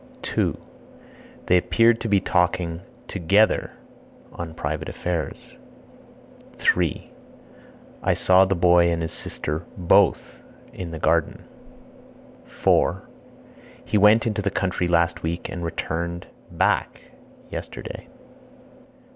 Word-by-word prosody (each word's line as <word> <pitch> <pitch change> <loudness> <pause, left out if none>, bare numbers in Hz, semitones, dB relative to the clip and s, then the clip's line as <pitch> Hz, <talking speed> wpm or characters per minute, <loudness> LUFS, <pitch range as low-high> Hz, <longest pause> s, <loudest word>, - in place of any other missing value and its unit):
2. - - -1 0.9
They 90 - +4
appeared 115 +5 +3
to 115 - -2
be 100 -2 +3
talking 90 -2 0 0.3
(together) 100 +4 +2 0.6
on 80 -2 -7
private 75 0 -4
affairs. 85 -5 -5 1.0
3. 85 -4 0 0.9
I - - +1
saw 95 +1 +5
the 95 +1 0
boy 85 0 +4
and 85 0 -1
his 80 - -3
sister 75 0 -5
(both) 90 -2 +2 0.3
in 90 -2 -6
the 80 - -6
garden. 80 0 0 1.0
4. - - +1 0.8
He 105 - +1
went 105 +3 +5
into 105 -2 -1
the 100 - 0
country 90 -2 -1
last 85 -1 +1
week 85 +1 -3
and 90 -4 -6
returned 85 +1 -4 0.2
(back) - - 0 0.5
yesterday. - - -7
85 Hz, 105 wpm, -23 LUFS, 85-95 Hz, 1.0 s, saw